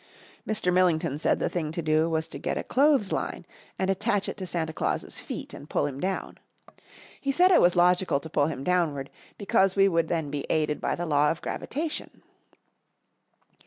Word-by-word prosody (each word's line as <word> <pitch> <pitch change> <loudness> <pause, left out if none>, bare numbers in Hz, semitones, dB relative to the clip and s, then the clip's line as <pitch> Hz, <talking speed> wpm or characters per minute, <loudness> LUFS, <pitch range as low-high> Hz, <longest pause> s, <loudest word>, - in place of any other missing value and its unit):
Mr. 195 -4 +1
Millington 170 -5 +2
said - - +2
the - - -1
thing 160 -4 -3
to 165 - -5
do 155 +1 +2
was 160 0 -1
to - - -9
get - - -2
a - - -2
clothesline 270 -6 +1 0.3
and 190 - 0
attach 205 +1 0
it - - -4
to 190 -2 -5
Santa 160 -2 -2
Claus's - - -2
feet - - -7
and 145 - -10
pull - - +1
him 140 -2 -4
down. 190 +3 -3 0.8
He 275 - -1
said 360 +6 +4
it 360 - +6
was 175 +1 +4
logical 180 -3 +3
to 160 - -9
pull 145 -2 +1
him 140 -4 -5
downward, 150 -6 0 0.3
because 195 -2 +2
we 195 0 +5
would 165 -3 +1
then 160 -4 -2
be 145 -1 -4
aided 155 -1 0
by - - 0
the 175 - -3
law 150 -2 +3
of 165 - -2
gravitation. 310 +2 -5
175 Hz, 190 wpm, -27 LUFS, 155-195 Hz, 0.8 s, it